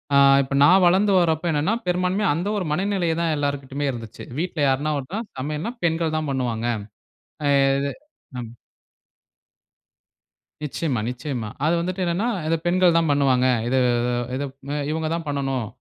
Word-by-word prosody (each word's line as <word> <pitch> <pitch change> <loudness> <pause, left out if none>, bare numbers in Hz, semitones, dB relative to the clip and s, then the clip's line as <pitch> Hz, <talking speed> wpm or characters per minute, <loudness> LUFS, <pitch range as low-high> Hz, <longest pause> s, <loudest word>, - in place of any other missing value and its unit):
ஆ - - +7 0.3
இப்ப 140 +1 -3
நான் 185 +4 +6
வளந்து 195 +3 +3
வரப்ப 160 -1 +1
என்னென்னா, 155 +9 +1
பெரும்பான்மையா, 185 +2 +1
அந்த 175 +4 -2
1 180 -5 -2
மனநிலையே 185 -2 0
தான் 165 -2 +1
எல்லார்கிட்டயுமே 140 0 -2
இருந்துச்சு. 115 -3 -8
வீட்ல 175 -3 -2
யார்னா 145 +3 +1
ஒருத்தனா 175 - -4 0.2
சமையல்னா, 150 - -3
பெண்கள் 165 -1 0
தான் 155 -2 -2
பண்ணுவாங்க. 120 -3 -1 0.8
அ - - +3 0.3
இது, 140 0 -1 0.5
ம். 120 0 -7 2.1
நிச்சயமா, 145 -4 -2
நிச்சயமா. 125 -3 -4 0.2
அது 160 +3 +3
வந்துட்டு 185 +2 -2
என்னென்னா, 175 +7 0 0.2
இத 165 - +2
பெண்கள் 180 -1 +4
தான் 165 -2 +2
பண்ணுவாங்க. 135 -3 +3 0.2
இது, 130 - +2 0.6
இது 140 +2 -2 0.5
இவுங்க 160 0 -2
தான் 165 - -5
பண்ணனும். 135 -5 -2
155 Hz, 140 wpm, -23 LUFS, 135-175 Hz, 2.1 s, ஆ